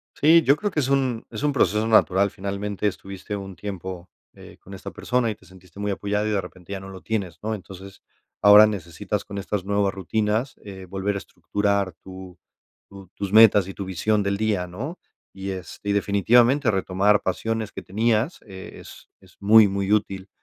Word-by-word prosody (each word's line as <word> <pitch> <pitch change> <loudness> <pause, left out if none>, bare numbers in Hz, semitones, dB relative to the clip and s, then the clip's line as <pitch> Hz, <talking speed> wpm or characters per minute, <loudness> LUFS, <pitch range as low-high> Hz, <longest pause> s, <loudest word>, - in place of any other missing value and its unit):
Sí, 165 +3 +6
yo 140 +1 +5
creo 205 +3 -2
que 160 - -1
es 130 - -2
un 130 -4 0
es - - -7
un 145 -1 +1
proceso 110 -4 +2
natural, 100 -3 +4
finalmente 100 +1 -3
estuviste 100 +1 -6
un 95 -1 -8
tiempo, 95 -3 -7 0.2
eh, - - -14
con 95 - -13
esta 95 - -8
persona 115 +3 -1
y - - -6
te 95 - -23
sentiste 90 0 -16
muy 105 0 -1
apoyada, 105 +2 -1
y - - -1
de 100 -2 +1
repente 90 +1 -11
ya 95 - -4
no 95 0 -10
lo 95 -1 -10
tienes, 100 -7 -3
¿no?, 110 +1 -2
entonces, 95 0 -12 0.4
ahora 105 +1 +8
necesitas 100 +1 -4
con 100 -1 -8
estas 100 0 -3
nuevas 100 -1 +1
rutinas, 110 +6 -1
eh, 95 -2 -9
volver 100 +2 -2
a - - -1
estructurar 100 -1 -2
tu, 95 -1 -11 0.5
tu 100 -1 -13
tus 100 -1 -4
metas 105 -3 +7
y 95 - -7
tu 100 - -6
visión 105 +3 0
del 100 0 -1
día, 105 -4 -1
¿no?, 130 - -7 0.3
y 95 0 -6
es 95 -2 -8
y 100 - -1
definitivamente 115 +6 +3
retomar 95 +1 +2
pasiones 110 +3 -2
que - - -7
tenías, 110 - 0
eh, 95 -2 -10
es - - -14
es 95 -2 -22
muy, 105 +1 +7
muy 100 +1 -1
útil, 100 -2 -1
100 Hz, 195 wpm, -23 LUFS, 95-110 Hz, 0.5 s, ahora